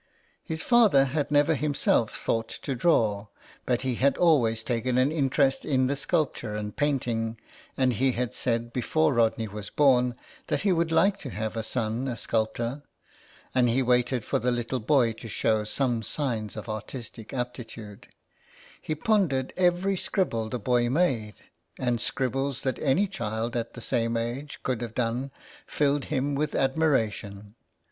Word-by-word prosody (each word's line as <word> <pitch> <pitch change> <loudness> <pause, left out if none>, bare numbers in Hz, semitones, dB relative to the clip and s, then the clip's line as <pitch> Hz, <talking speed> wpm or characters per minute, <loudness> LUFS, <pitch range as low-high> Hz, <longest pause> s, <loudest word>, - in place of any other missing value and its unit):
His 160 0 -3
father 220 - +5
had 140 +2 -1
never 145 +2 +4
himself 140 -6 +1
thought 115 0 -1
to 140 - -2
draw, 110 -7 +2 0.4
but 125 0 +1
he 130 -1 0
had 140 +1 +3
always 120 -10 +3
taken 125 +1 -1
an 130 +3 +3
interest 135 -3 +1
in 130 -1 +1
sculpture 140 -8 -1
and 105 -1 -5
painting, 120 -6 -1 0.4
and 130 -2 +3
he 130 +3 +1
had 125 -2 -2
said 115 -1 -1
before 145 +4 +1
Rodney 115 -1 +2
was 105 0 -7
born 125 -4 +3 0.3
that - - 0
he 200 - +2
would 170 -2 +1
like 195 +5 +3
to 140 - -7
have 110 -1 -4
a 115 - -1
son 115 +2 -2
a 120 -3 -3
sculptor. 115 +5 -2 0.7
And 125 -2 +3
he 130 +3 +2
waited 125 -1 +1
for - - 0
the 125 - 0
little 120 +1 -2
boy 120 -1 +3
to 115 - -10
show 110 0 +1
some 120 +1 0
signs 110 -4 -3
of 110 - -6
artistic 110 +1 -7
aptitude. 115 -4 -6 0.7
He 155 - -3
pondered 155 - +1
every 180 +2 +2
scribble 115 - -1
the 125 - -2
boy 120 +1 +1
made, 125 - +1 0.4
and 120 -3 0
scribbles 135 +2 -1
that 130 - -2
any 155 +8 +2
child 115 - -3
at 115 -1 -3
the 120 - -8
same 115 0 0
age 130 +4 -4
could 125 -3 -1
have 115 -2 -5
done 125 +3 -1 0.4
filled 145 -1 +1
him 145 -1 -1
with 145 +1 -1
admiration. 110 -8 0
125 Hz, 160 wpm, -27 LUFS, 115-140 Hz, 0.7 s, father